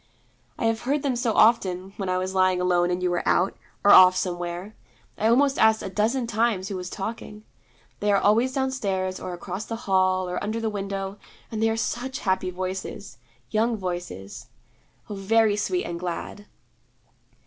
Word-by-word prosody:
'I - - -2
have 225 0 +1
heard 280 +3 -1
them 270 -3 0
so 240 -2 0
often 195 -4 +3
when 195 -2 -3
I 185 - +1
was 185 +1 -2
lying 185 -1 +3
alone 175 -1 +2
and 180 +1 -2
you 180 - +1
were 175 - 0
out, 185 +3 +2 0.3
or 205 - +6
off 185 0 +9
somewhere. 175 +2 -3 0.4
I 215 - 0
almost 270 +4 +3
asked 220 0 +4
a 190 - -5
dozen 230 +6 0
times 220 -4 0
who 200 - -4
was 180 -1 -5
talking. 210 +1 -6 0.6
They 205 0 +1
are 200 - +4
always 230 +5 +3
downstairs, 200 -9 -2
or 185 - -6
across 185 +4 -6
the 230 - -4
hall, 185 -1 +2
or 180 - -3
under 215 +2 -2
the 225 -1 -2
window; 195 0 -4 0.3
and 220 -1 -3
they 225 - +3
are 225 - -1
such 250 +3 -3
happy 190 -2 0
voices: 185 - -6 0.3
young 225 +1 +1
voices 175 - -6 0.6
oh, - - -6
very 210 +2 +2
sweet 360 - -1
and 170 0 -5
glad.' 180 +4 -5
195 Hz, 180 wpm, -25 LUFS, 185-225 Hz, 0.6 s, off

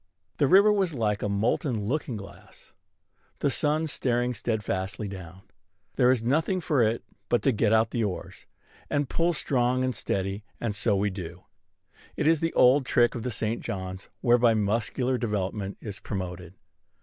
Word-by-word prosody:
The 140 - +3
river 200 +6 +6
was 190 -6 0
like 105 -4 0
a 105 - -1
molten 110 +2 0
looking 130 -1 -2
glass, 100 -1 -13 0.6
the 140 - +1
sun 150 +4 +1
staring 125 -4 0
steadfastly 105 -3 -2
down. 95 -1 -9 0.5
There 125 -2 +4
is 125 -3 +1
nothing 160 +9 +1
for 150 -6 +1
it 115 +1 +1 0.3
but 120 - +2
to 135 - +4
get 110 -1 +1
out 110 0 +3
the 115 - 0
oars, 100 -4 -5 0.4
and 145 -1 0
pull 170 +5 +1
strong 130 -4 +1
and 130 0 0
steady; 100 -1 -2 0.2
and 115 -3 -2
so 105 0 +1
we 100 +1 +1
do. 90 -2 -8 0.7
It 150 - 0
is 160 0 +4
the 165 +1 -1
old 130 +3 +5
trick 120 -1 +3
of 120 - -5
this 120 -1 -3
St. 110 +1 -2
John's, 95 -1 -6
whereby 120 -1 +4
muscular 115 +4 0
development 100 -2 -2
is 100 -3 -7
promoted. 90 -2 -6
115 Hz, 165 wpm, -27 LUFS, 100-130 Hz, 0.7 s, river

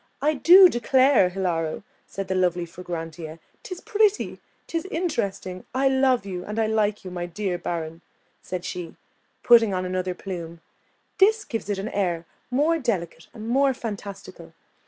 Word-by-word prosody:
"I 300 +2 +2
do 360 +6 +8
declare, 255 - +4
Hilaro," 175 -4 -2 0.2
said 195 -1 -5
the 190 - -1
lovely 180 -2 +1
Fragrantia, 165 -2 -7 0.2
"'tis 365 -2 -8
pretty, 425 -1 +1 0.3
'tis 330 +1 -3
interesting; 200 - -3
I 270 +1 +3
love 265 -4 +2
you, 180 -2 -5
and 210 +3 -6
I 225 - +2
like 215 -2 0
you, 185 - -6
my 175 -1 -4
dear 180 0 -3
Baron," 165 -1 -4 0.4
said 180 -1 -5
she, 175 -2 -6 0.5
putting 230 -5 +6
on 185 0 -2
another 185 0 -2
plume: 170 -3 -7 0.6
"this 420 +2 +4
gives 225 -4 -5
it 205 - 0
an 195 +3 -4
air 175 -6 -1 0.2
more 300 +6 +2
delicate 180 - -3
and 220 -1 -8
more 270 +2 +3
fantastical. 200 -6 -8
195 Hz, 155 wpm, -24 LUFS, 180-260 Hz, 0.6 s, do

